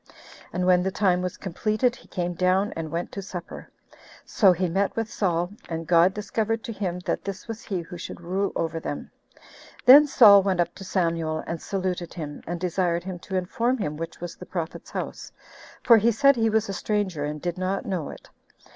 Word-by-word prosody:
And 180 +1 -1
when 180 -1 +5
the 190 - 0
time 185 -2 +1
was 180 -1 -4
completed, 215 +6 0
he - - -18
came 175 -1 -3
down 185 +3 +1
and 165 -1 -4
went 170 +2 -3
to 200 - -5
supper; 180 -3 -8 0.6
so 195 -4 +4
he 180 +1 0
met 195 +4 0
with 225 -1 -3
Saul, 175 -2 0 0.2
and 165 0 -4
God 170 +2 +5
discovered 220 +1 -2
to 230 - -5
him 185 -4 -3
that - - -2
this 195 +2 -6
was 225 0 -6
he 190 -5 -2
who 170 +1 -9
should - - -7
rule 185 +3 -1
over 165 0 -2
them. 145 - -6 0.7
Then 285 +4 +9
Saul 210 -7 +8
went 190 -2 0
up 175 - +1
to 195 - -10
Samuel 165 -4 -1
and 165 -1 -5
saluted 185 -3 -3
him, 150 -4 -6
and 175 +1 -3
desired 175 -1 0
him 185 -1 -6
to 190 - -6
inform 230 +8 0
him 155 -9 -3
which 165 +2 -6
was 175 -1 -6
the 180 - -11
prophet's 165 -3 -5
house; - - -6 0.5
for 235 -2 +7
he 225 +2 +3
said 275 +5 +5
he 225 -2 +2
was 220 0 +1
a 195 - -4
stranger 195 -6 -1
and 150 +1 -3
did 175 +2 -4
not 185 +1 -2
know 180 -7 -3
it. - - -11
185 Hz, 205 wpm, -25 LUFS, 170-205 Hz, 0.7 s, Then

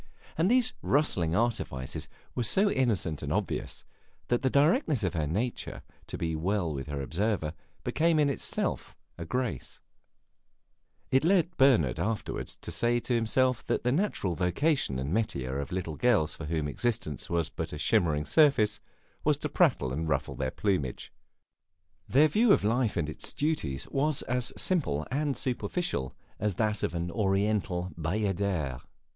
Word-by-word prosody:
And 165 +4 +2
these 250 +1 +3
rustling 90 - +1
artifices 105 - -2 0.3
were 125 - -2
so 195 - +3
innocent 100 - 0
and - - -4
obvious - - -2 0.4
that 120 - +2
the 130 - +2
directness 150 - +3
of 90 - 0
her 80 -3 -1
desire 110 +10 -3 0.2
to - - -5
be 80 -1 -2
well 90 0 0
with 70 0 -5
her 70 -2 -3
observer 85 0 -1 0.3
became 165 0 +2
in 150 -1 +4
itself 140 - -1 0.2
a 85 - -4
grace; 110 - -3 1.3
it 130 +2 +4
led 180 0 +3
Bernard 110 - +4
afterward 110 +5 -2
to - - -7
say 120 0 +2
to 125 - -2
himself 120 +2 +2
that - - 0
the 125 - +2
natural 145 - 0
vocation 90 - +1
and 70 +5 -2
metier 70 - -1
of 70 - -5
little 85 -5 -3
girls 110 -11 +3
for 80 - -7
whom 80 -1 -1
existence 105 - -2
was 85 -2 0
but - - -5
a - - -5
shimmering 75 -3 +2
surface, 140 - +4 0.4
was - - +3
to - - -3
prattle 65 0 +2
and 80 +3 -2
ruffle 70 -3 0
their 65 -1 -2
plumage; 90 - -2 1.0
their 145 +5 +6
view 220 +8 +3
of - - +4
life 115 +1 +1
and 80 -4 0
its 75 - -5
duties 140 - -1
was 145 +1 +1
as 125 0 0
simple 135 - 0
and 145 0 0
superficial 130 - -2 0.2
as 105 -3 0
that 105 +1 0
of - - -1
an 85 +1 -2
Oriental 95 -2 0
bayadere. 90 - -1
105 Hz, 155 wpm, -29 LUFS, 80-130 Hz, 1.3 s, their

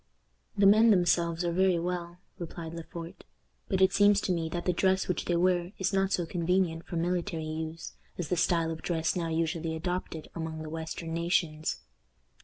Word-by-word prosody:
"The 200 - +4
men 215 +3 +7
themselves 175 -3 +2
are 170 - +1
very 185 0 +3
well," 175 0 -3 0.2
replied 170 -1 -6
Le 170 - -5
Port, 165 +1 -9 0.5
"but 190 - +1
it 190 +1 +4
seems 205 0 +5
to - - -1
me 165 -2 -1
that 175 +1 -4
the 180 - +2
dress 190 +2 +2
which 180 - -1
they 175 - +1
wear 175 +1 +1
is 190 +1 -1
not 195 0 +2
so 175 -3 +1
convenient 170 -1 0
for - - -5
military 170 0 -1
use 160 +1 -5 0.2
as 175 - -4
the 180 - +2
style 165 -1 +2
of 160 - -6
dress 165 -2 0
now 170 -2 -1
usually 165 0 -1
adopted 165 -1 -4
among 160 -1 -5
the 155 - -7
western 165 0 -5
nations." 165 -2 0
170 Hz, 190 wpm, -29 LUFS, 165-180 Hz, 0.5 s, men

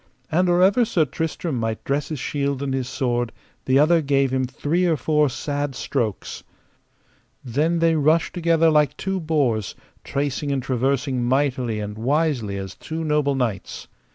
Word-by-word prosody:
And 180 +3 +2
or 175 +1 +4
ever 200 +6 +4
Sir 190 -9 +2
Tristram 160 -1 -3
might 115 -1 -3
dress 140 +1 -1
his 155 - -3
shield 140 0 -2
and 135 -1 -2
his 130 -1 -2
sword 120 -3 -1 0.3
the 130 +1 +3
other 160 +3 +4
gave 140 -2 +1
him 130 -1 +1
three 145 +7 -1
or 165 -2 +2
four 150 0 +2
sad 145 +1 -3
strokes. 115 -8 -3 1.0
Then 150 +8 +1
they 165 0 +3
rushed 155 +2 +2
together 165 -2 +3
like 150 -1 +2
two 190 0 -2
boars, 140 - 0 0.3
tracing 140 +1 -2
and 135 -2 -1
traversing 130 0 0
mightily 125 -3 0
and 105 +1 -5
wisely 130 -5 0
as 95 -1 -6
two 160 +1 -6
noble 150 -2 +1
knights. 115 -8 -3
140 Hz, 160 wpm, -22 LUFS, 125-160 Hz, 1.0 s, or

